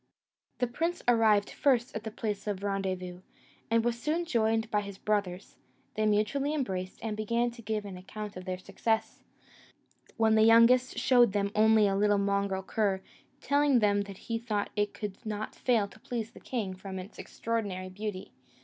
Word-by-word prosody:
The 250 - +1
prince 330 +9 -2
arrived 220 -4 +4
first 255 -4 +1
at 220 - -2
the 220 - -4
place 215 -2 -4
of 200 -1 -3
rendezvous, 185 -3 -3 0.5
and 230 0 +2
was 235 0 -1
soon 325 +5 0
joined 225 -5 +1
by 210 - +2
his 200 -1 -8
brothers: 200 -3 -2 0.4
they 215 0 +1
mutually 240 +8 +1
embraced, 190 -9 -3
and 220 -2 -2
began 235 +3 0
to 235 0 -12
give 215 -1 -3
an 195 -2 -7
account 210 +3 -7
of 185 0 -8
their 185 -1 -3
success; 220 +4 -2 1.0
when 225 -1 +4
the 220 - +5
youngest 230 +3 +5
showed 245 -5 +4
them 200 -1 0
only 220 0 +5
a 195 - +1
little 205 +1 +3
mongrel 200 -1 0
cur, 195 -1 0 0.4
telling 285 -1 +3
them 205 -3 +3
that 200 -1 -7
he 230 +2 -4
thought 215 -3 -2
it 205 -1 0
could 205 0 -6
not 215 -1 -4
fail 230 -5 +1
to 215 - -17
please 225 -1 -4
the - - -14
king, 215 -7 -3
from 190 0 -7
its 185 +3 -9
extraordinary 200 -5 -3
beauty. 200 0 -6
215 Hz, 175 wpm, -30 LUFS, 200-230 Hz, 1.0 s, the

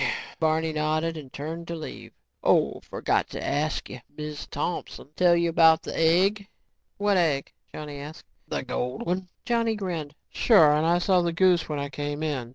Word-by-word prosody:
Barney 160 0 +1
nodded 155 +2 0
and 145 -5 -9
turned 165 +4 -6
to 170 - -4
leave. 160 - -8 0.3
"Oh, - - +2
forgot - - -1
to - - -5
ask 155 +2 -1
you. 125 - -8 0.2
Miz 150 -1 -6
Thompson 150 -1 -4
tell 175 -1 +5
you 170 0 +2
about 160 -1 +5
the - - -5
egg?" 190 +5 +3 0.5
"What 205 -1 +2
egg?" 150 -6 +1 0.2
Johnny 150 -2 -7
asked. 150 +3 -9 0.2
"The - - -3
gold 125 0 -3
one." 180 +1 -2 0.2
Johnny 230 -2 +1
grinned. 170 -7 -4 0.2
"Sure, 165 -11 +5
and 155 +2 +2
I 170 +1 +4
saw 180 0 +3
the 170 -1 0
goose 175 -1 +3
when 150 - -2
I 140 0 -3
came 145 +1 -4
in. 135 -6 -2
160 Hz, 175 wpm, -26 LUFS, 150-175 Hz, 0.5 s, tell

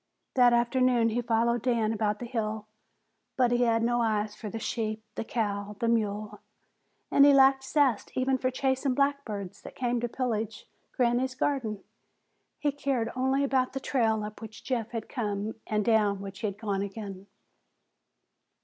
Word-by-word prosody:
That 245 -2 +6
afternoon 240 0 +3
he 235 +2 0
followed 235 0 +1
Dan 230 -3 +1
about 210 -1 0
the 245 - -6
hill, 220 -3 -3 0.7
but 250 -2 +3
he 245 0 +3
had 230 -1 +2
no 240 +1 +2
eyes 215 -2 0
for 215 - -7
the 225 - -5
sheep, 220 -1 -3
the - - -3
cow, 205 -3 -2
the 230 - 0
mule, 215 -2 -1 0.7
and 280 - +6
he 285 0 +7
lacked 270 0 +5
zest 265 -5 +1
even 260 0 +1
for 255 - +1
chasing 265 0 0
blackbirds 275 -9 -1
that - - -11
came 245 -1 0
to 240 0 -2
pillage 225 -4 -3 0.3
Granny's 250 +1 +1
garden. 250 -7 -1 0.7
He 290 - 0
cared 270 -5 -1
only 265 +2 +1
about 260 -2 +1
the 270 - -2
trail 225 -5 +1
up 210 +1 -7
which 220 -1 -10
Jeff 235 -4 -2
had 230 -2 -5
come 210 -3 -3
and 210 -1 0
down 210 -3 +3
which 195 -1 -8
he 220 - -1
had 200 -1 -5
gone 205 -3 -2
again. 200 -1 -6
230 Hz, 165 wpm, -28 LUFS, 215-255 Hz, 0.7 s, he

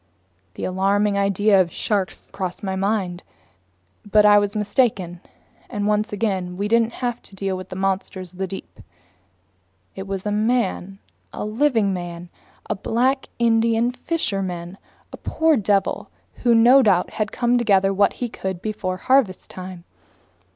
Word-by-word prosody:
The - - -7
alarming 200 +2 +1
idea 200 0 +3
of 170 -2 -2
sharks 200 -3 -1
crossed 185 -1 -5
my 190 -1 -2
mind. 190 -2 -1 0.8
But 210 0 +4
I 205 0 +7
was 205 +1 -2
mistaken, 205 -5 0 0.5
and 205 -1 -3
once 210 0 +1
again 190 -4 -2
we 200 +2 -1
didn't 230 +1 +2
have 240 -1 -2
to 195 - -10
deal 195 0 -2
with 185 0 -8
monsters 190 -1 -2
of 185 - -16
the 190 - -1
deep. 190 - -8 1.1
It 190 0 -7
was 195 0 -4
a 210 - -1
man, 210 -3 0 0.3
a - - -5
living 225 -3 +1
man, 175 -1 -6 0.4
a - - 0
black 250 +6 0
Indian 230 0 +2
fisherman, 195 - -3 0.3
a - - -7
poor 320 -1 +2
devil 205 -4 0 0.3
who 240 -2 +3
no 245 +4 +7
doubt 190 -7 +2
had 215 -1 -2
come 245 0 +1
to - - 0
gather 195 -3 +3
what 200 +1 +3
he 245 - -3
could 190 -5 -5
before 190 -2 -3
harvest 250 -4 +1
time. 185 -1 -8
200 Hz, 150 wpm, -22 LUFS, 190-225 Hz, 1.1 s, I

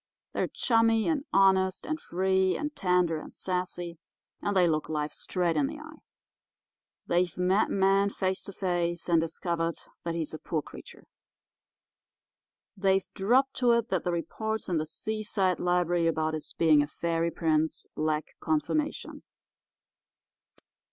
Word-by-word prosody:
They're - - 0
chummy 225 -2 +2
and 305 -3 0
honest 190 -1 +3
and 310 0 -2
free 190 +1 +1
and 295 0 -4
tender 180 -4 +2
and - - -10
sassy, 180 -2 -3 0.4
and 205 -1 0
they 180 -1 +5
look 155 -2 0
life 150 -1 -2
straight 175 -3 -1
in 145 -3 +2
the - - -6
eye. - - -11 1.1
They've 175 0 +1
met 185 +3 +2
man 195 +1 +3
face 190 -1 -1
to - - -6
face, 175 -2 -1
and 170 -2 +4
discovered 165 0 -2 0.3
that 170 -1 -2
he's 160 -2 -3
a 155 - -6
poor 155 -3 -2
creature. - - -12 1.7
They've 195 -1 +2
dropped 255 +7 +2
to 245 -2 +4
it 235 0 +1
that 185 -3 0
the 175 - 0
reports 220 +6 -3
in 175 - +1
the 155 - -3
Seaside 205 0 -1
Library 175 -1 +2
about 160 -1 0
his 155 - -4
being 155 -3 +5
a 145 - -1
fairy 165 +1 -1
prince 160 -2 0
lack 155 0 -1
confirmation. 170 - -1
180 Hz, 145 wpm, -28 LUFS, 165-195 Hz, 1.7 s, they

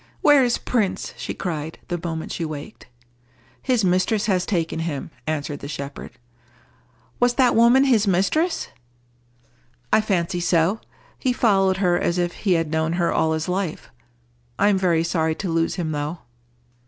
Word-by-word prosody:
"Where 290 -3 +6
is 240 -1 +1
Prince?" 215 -6 -1
she - - -5
cried, 160 -3 -4
the 175 -1 -3
moment 165 -2 -4
she 170 - -3
waked. 155 +4 -7 0.7
"His 245 -6 +1
mistress 185 +4 +1
has 185 -4 0
taken 165 -5 -1
him," 160 -2 -4 0.2
answered 145 -2 -3
the - - -7
shepherd. 140 -1 -7 1.1
"Was 245 0 +3
that 255 -3 +3
woman 235 +4 +6
his 230 -6 +3
mistress?" 255 - +1 1.2
"I - - +6
fancy 180 -4 -1
so. 175 +4 +1 0.4
He 255 - +1
followed 195 -6 +2
her 175 -2 +2
as 170 - 0
if 175 -1 0
he 195 -4 0
had 165 -2 0
known 160 +1 0
her 175 -1 +1
all 160 0 +2
his 160 +2 -2
life. 180 -2 -3 0.7
I - - +4
am 200 - +3
very 170 -3 +2
sorry 160 -2 0
to 190 - -4
lose 165 0 0
him, 165 -4 -3
though." 150 +3 -3
175 Hz, 160 wpm, -22 LUFS, 160-210 Hz, 1.2 s, Where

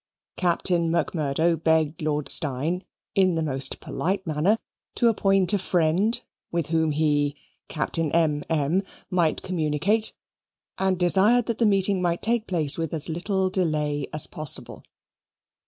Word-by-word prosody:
Captain 175 -1 +1
Macmurdo 165 -1 0
begged 160 0 0
Lord 150 -1 -2
Steyne, 155 +5 +2 0.3
in 185 -3 +2
the 160 - -1
most 135 -3 -1
polite 190 +2 -3
manner, 165 +7 +1 0.4
to 235 - +3
appoint 195 -3 +2
a 205 - +2
friend, 180 +5 0 0.3
with 170 -3 -2
whom 160 -1 +1
he 145 -1 0 0.3
(Captain 160 0 -1
M.M.) 160 +1 0 0.3
might 170 -4 +1
communicate, 180 +5 +1 0.6
and 190 -1 +1
desired 200 +7 +4
that 235 - -3
the 230 - +3
meeting 195 -1 +2
might 175 -1 -1
take 230 0 0
place 160 -5 +2
with 165 0 -3
as 155 +1 +1
little 190 +3 -1
delay 150 -6 -1
as 155 - -1
possible. 155 -3 -1
170 Hz, 135 wpm, -24 LUFS, 155-190 Hz, 0.6 s, desired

